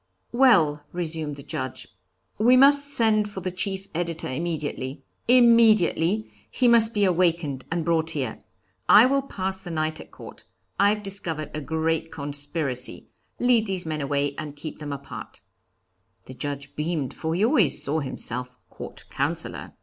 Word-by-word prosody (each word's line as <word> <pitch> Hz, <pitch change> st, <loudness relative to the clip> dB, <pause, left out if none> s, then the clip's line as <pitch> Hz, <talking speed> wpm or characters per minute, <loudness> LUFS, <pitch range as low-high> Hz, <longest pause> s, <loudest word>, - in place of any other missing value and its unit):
'Well,' 190 Hz, -, +4 dB
resumed 160 Hz, -4 st, -3 dB
the 140 Hz, -, -11 dB
Judge, 130 Hz, -1 st, -5 dB, 0.5 s
'we 245 Hz, +4 st, +5 dB
must 285 Hz, +2 st, +6 dB
send 220 Hz, -5 st, +3 dB
for 195 Hz, -2 st, -7 dB
the 185 Hz, +1 st, -3 dB
chief 190 Hz, +1 st, -3 dB
editor 165 Hz, -1 st, -3 dB
immediately 145 Hz, -2 st, -4 dB, 0.2 s
immediately, 220 Hz, -5 st, +4 dB, 0.2 s
he 250 Hz, -, +1 dB
must 230 Hz, -1 st, +5 dB
be 205 Hz, -1 st, +3 dB
awakened 170 Hz, -6 st, 0 dB
and 165 Hz, -1 st, -1 dB
brought 165 Hz, -1 st, +1 dB
here. 130 Hz, -6 st, -4 dB, 0.5 s
I 215 Hz, +3 st, +9 dB
will 275 Hz, +2 st, +2 dB
pass 190 Hz, -7 st, -4 dB
the 180 Hz, -, -9 dB
night 155 Hz, -1 st, -2 dB
at -, -, -11 dB
court. -, -, -12 dB, 0.4 s
I've 205 Hz, +1 st, +3 dB
discovered 170 Hz, -7 st, -4 dB
a 155 Hz, -, -4 dB
great 160 Hz, +1 st, -1 dB
conspiracy. 145 Hz, -2 st, -4 dB, 0.3 s
Lead 240 Hz, -3 st, +2 dB
these 190 Hz, -3 st, -2 dB
men 155 Hz, -1 st, -3 dB
away 140 Hz, 0 st, -1 dB
and 150 Hz, -2 st, -7 dB
keep 150 Hz, +2 st, -8 dB
them 150 Hz, -1 st, -6 dB
apart.' 140 Hz, 0 st, -8 dB, 0.8 s
The 130 Hz, -, -10 dB
Judge 140 Hz, +1 st, -6 dB
beamed, 150 Hz, -4 st, -2 dB
for 160 Hz, 0 st, -3 dB
he 200 Hz, +5 st, +2 dB
already 230 Hz, -, +4 dB
saw 150 Hz, +4 st, +1 dB
himself 125 Hz, -2 st, -4 dB, 0.2 s
Court -, -, -10 dB
Counsellor. -, -, -3 dB
165 Hz, 150 wpm, -25 LUFS, 145-210 Hz, 0.8 s, I